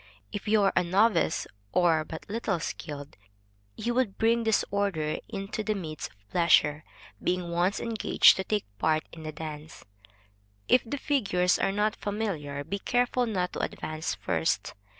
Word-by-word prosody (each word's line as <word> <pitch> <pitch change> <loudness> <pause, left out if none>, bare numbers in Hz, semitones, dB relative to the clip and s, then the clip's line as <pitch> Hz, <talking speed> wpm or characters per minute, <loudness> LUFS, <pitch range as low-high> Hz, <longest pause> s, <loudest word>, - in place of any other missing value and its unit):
If 205 - -5
you 210 -1 +4
are 195 - +3
a 180 - +4
novice 185 0 +2 0.3
or 165 -3 +3
but 160 +1 -9
little 205 -4 -1
skilled, 145 -2 -6 0.6
you 235 +2 -2
would 240 -6 0
bring 230 +1 +3
disorder 200 -7 0
into 200 +1 -4
the 215 0 0
midst 160 -6 -5
of 100 0 -29
pleasure. 155 -3 +4 0.4
Being 180 -1 -1
once 175 +4 +1
engaged 225 -2 +5
to 190 - -1
take 210 +1 -1
part 155 +4 +2
in 165 - -10
the 155 0 -5
dance, 155 0 -8 0.8
if 250 - +5
the 245 +5 -4
figures 200 -12 +1
are 195 - +2
not 210 +1 +1
familiar, 175 -10 -3
be 200 +6 -4
careful 245 +2 +1
not 185 -5 -1
to - - -4
advance 155 - -3
first. 80 -4 -1
185 Hz, 155 wpm, -28 LUFS, 155-215 Hz, 0.8 s, engaged